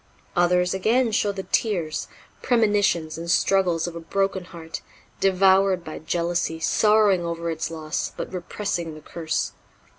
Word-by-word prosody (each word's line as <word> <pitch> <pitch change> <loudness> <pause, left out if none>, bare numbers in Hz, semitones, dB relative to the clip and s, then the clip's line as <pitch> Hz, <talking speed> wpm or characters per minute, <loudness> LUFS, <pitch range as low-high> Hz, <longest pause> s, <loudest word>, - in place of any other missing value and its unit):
Others, 180 +1 +3
again, 225 +5 +2
show 210 -1 +1
the 195 -1 -5
tears, 175 -10 -1 0.3
premonitions 205 -9 +2
and 170 +1 -6
struggles 180 -2 +2
of 175 -1 -5
a - - -4
broken 195 +2 -1
heart, 165 -2 -8 0.4
devoured 190 -1 +4
by 155 - -7
jealousy, 170 +1 -1
sorrowing 210 0 +3
over 170 0 -3
its 160 0 -3
loss, 160 -1 -3
but - - -5
repressing 175 -2 -3
the 155 - -11
curse. 160 +1 -2
175 Hz, 140 wpm, -24 LUFS, 165-195 Hz, 0.4 s, devoured